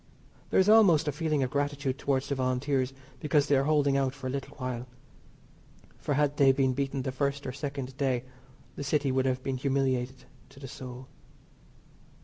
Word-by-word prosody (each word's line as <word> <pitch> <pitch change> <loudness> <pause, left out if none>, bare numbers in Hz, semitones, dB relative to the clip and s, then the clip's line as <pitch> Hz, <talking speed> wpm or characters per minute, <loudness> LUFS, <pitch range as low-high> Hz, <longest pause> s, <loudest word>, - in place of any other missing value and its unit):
There - - +3
is 190 - +4
almost 190 -8 +6
a - - +2
feeling 150 -1 0
of 130 - -2
gratitude 145 -2 -1
towards 135 -1 0
the - - -1
Volunteers 130 0 0 0.3
because 150 -1 +2
they 145 - +3
are 135 0 +2
holding 145 -2 +3
out 135 -1 0
for 140 -2 -10
a 130 - -1
little 140 +1 -5
while, 125 -2 -4 1.1
for 145 - -1
had 145 0 +1
they 135 -1 +6
been 130 -1 +1
beaten 135 0 -2
the 130 - -2
first 140 +1 -2
or 130 - -3
second 140 -1 -5
day 130 -3 0 0.5
the - - -5
City 145 -1 +1
would 130 0 +1
have 130 0 -1
been 135 -1 -2
humiliated 130 -1 -1 0.3
to 135 - -16
the 135 - -8
soul. 130 0 -9
135 Hz, 185 wpm, -29 LUFS, 130-145 Hz, 1.1 s, almost